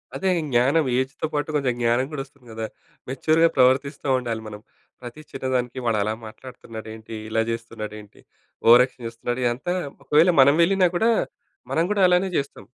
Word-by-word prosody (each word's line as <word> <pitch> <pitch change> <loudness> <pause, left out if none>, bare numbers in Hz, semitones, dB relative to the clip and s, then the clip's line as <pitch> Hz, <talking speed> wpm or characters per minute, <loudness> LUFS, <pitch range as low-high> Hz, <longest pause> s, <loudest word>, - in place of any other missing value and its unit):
అదే 190 - 0 0.2
జ్ఞానం 135 +6 +3
ఏజ్‌తో 135 +4 -3
పాటు 150 +1 -1
కొంచెం 135 -4 +1
జ్ఞానం 120 +2 +2
కూడా 145 -3 -4
వస్తుంది 135 -3 -24
కదా! 110 0 -4 0.4
మెచ్యూర్‌గా 160 +5 +3
ప్రవర్తిస్తా 135 +3 +2
ఉండాలి 115 -3 -3
మనం. 105 -1 -9 0.4
ప్రతి 120 +5 -9
చిన్నదానికి 130 -1 -2
వాడలా 110 -2 +1
మాట్లాడుతున్నాడేంటి? 110 -2 -10
ఇలా 110 0 +1
చేస్తున్నాడేంటి? 110 -2 -7 0.5
ఓవర్ 120 +2 +9
యాక్షన్ 125 -2 -13
చేస్తున్నాడు. 120 +2 -4
ఇదంతా 130 +10 -1 0.3
ఒకవేళ 160 +4 +4
మనం 140 +2 +6
వెళ్ళినా 185 +1 +3
కూడా 225 +6 +3 0.6
మనం 165 - +2
గూడా 205 -2 +1
అలానే 180 +2 +2
చేస్తాం. 140 - -5
130 Hz, 145 wpm, -23 LUFS, 115-150 Hz, 0.6 s, ఓవర్